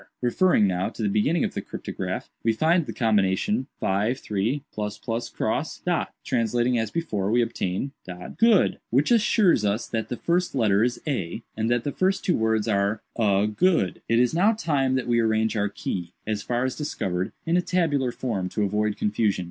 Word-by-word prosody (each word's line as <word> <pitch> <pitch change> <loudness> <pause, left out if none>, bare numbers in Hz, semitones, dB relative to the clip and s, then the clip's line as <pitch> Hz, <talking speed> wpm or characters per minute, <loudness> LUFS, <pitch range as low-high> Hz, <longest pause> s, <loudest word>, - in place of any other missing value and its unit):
"Referring, 125 - +3
now, 95 -1 0
to 115 - -6
the - - +2
beginning 110 +12 +1
of - - -1
the - - -3
cryptograph, - - -5 0.2
we 115 - +3
find 160 +6 +2
the - - -3
combination, 110 - +1 0.2
53‡‡†. 110 +1 -2 0.2
"Translating 120 +1 +1
as 110 -1 -1
before, 105 - -2
we 120 +2 +3
obtain 115 +2 -2 0.5
good, 225 -4 +4
which 135 - +2
assures 210 - +4
us 105 +2 0
that 110 -1 -3
the 120 - -3
first 175 -1 0
letter 105 -4 +3
is 125 +1 0
A, 115 - -3
and 110 +1 -1
that 120 -1 +1
the 145 - -2
first 190 +6 0
two 180 - +3
words 110 -1 +1
are 100 0 0
'A 100 -3 +2
good.' 165 - +2
"It 115 - +3
is 125 +3 +3
now 195 +7 +4
time 145 -11 0
that 130 - -1
we 120 -1 +2
arrange 110 0 +1
our 105 -1 +1
key, 90 -3 -5
as 105 -1 -2
far 120 +3 -1
as 130 - -2
discovered, 95 - -2
in 165 +1 +1
a 180 - +4
tabular 160 -8 +1
form, 105 -8 -3
to 105 - -1
avoid 105 +1 0
confusion. 105 -1 +1
115 Hz, 175 wpm, -25 LUFS, 105-145 Hz, 0.5 s, good